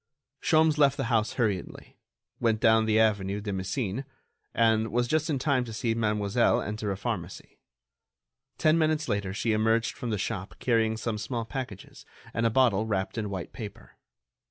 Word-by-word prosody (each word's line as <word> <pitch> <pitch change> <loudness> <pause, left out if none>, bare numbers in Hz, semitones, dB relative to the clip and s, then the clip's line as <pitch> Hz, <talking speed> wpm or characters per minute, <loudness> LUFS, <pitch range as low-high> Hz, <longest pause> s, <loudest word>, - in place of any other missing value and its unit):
Sholmes 155 -1 +3
left 140 -1 +4
the - - -1
house 110 -1 +2
hurriedly, 105 -7 -3 0.4
went 115 -2 +1
down 110 0 +4
the 110 0 +3
avenue 105 -2 +1
de 105 -1 -4
Messine, 95 +5 -2 0.5
and 110 -1 +2
was 120 +2 +1
just 155 +4 0
in 145 - +1
time 130 -1 +1
to 115 - -8
see 115 0 0
Mademoiselle 105 0 +2
enter 105 0 -3
a 95 - -3
pharmacy. 100 -4 -5 1.0
Ten 155 +1 +3
minutes 155 0 +1
later 100 -4 -1
she 110 +3 0
emerged 110 +2 +1
from 125 -4 -5
the 105 - 0
shop 95 0 -4
carrying 115 -2 +1
some 110 -1 -3
small 115 +2 -3
packages 120 -6 -7 0.3
and 115 +1 +1
a - - +2
bottle 110 -3 +3
wrapped 95 -3 -2
in 110 -3 -3
white 95 -3 -5
paper. 105 -5 -10
110 Hz, 170 wpm, -28 LUFS, 105-120 Hz, 1.0 s, left